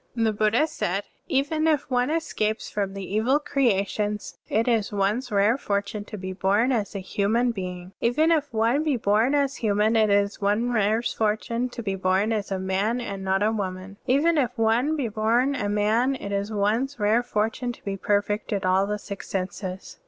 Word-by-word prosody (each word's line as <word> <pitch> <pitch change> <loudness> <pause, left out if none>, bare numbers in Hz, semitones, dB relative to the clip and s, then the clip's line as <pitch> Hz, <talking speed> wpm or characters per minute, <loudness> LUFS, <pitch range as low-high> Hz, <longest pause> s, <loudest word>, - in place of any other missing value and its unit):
(36) 230 - 0
The 220 - +2
Buddha 215 +7 +2
said: 195 - -2 0.2
" - - -46
Even 310 +3 0
if 300 -3 +1
one 250 +1 +2
escapes 235 -9 -1
from 200 -2 -2
the 195 -1 -5
evil 235 +7 +3
creations, 210 -7 -1
it 225 +3 +1
is 225 -4 +1
one's 210 +5 0
rare 210 +5 +3
fortune 205 -1 -2
to 210 - -8
be 185 -1 -5
bom 200 +7 +2
as 215 -5 -1
a 195 - -4
htmian 225 +6 +1
being. 180 -2 -6
Even 305 +8 +3
if 300 -3 +1
one 230 +5 +2
be 300 -5 +1
bom 220 +5 +2
as 280 -1 0
htmian, 215 0 +2
it 215 -1 +4
is 200 +1 +1
one's 210 +5 +1
rare 215 +1 +2
fortune 230 +3 -1
to 240 -1 -7
be 195 -2 -1
bom 190 +3 +1
as 210 -3 -2
a 195 - 0
man 190 +5 0
and 200 -5 -5
not 190 +1 +1
a 215 - +3
woman.* 195 -2 -4
Even 300 +5 +3
if 250 -2 -1
one 230 +7 +2
be 275 -6 -1
bom 230 +5 +1
a 205 -7 -2
man, 220 +6 +2
it 200 -6 -6
is 200 +2 -2
one's 225 +6 0
rare 215 +3 +3
fortune 245 +1 -1
to - - -14
be 200 -1 -2
perfect 205 +1 -1
in 200 -1 -1
all 185 +2 +2
the 210 0 -1
six 200 -1 -8
senses. 185 0 -5
215 Hz, 200 wpm, -25 LUFS, 200-245 Hz, 0.2 s, it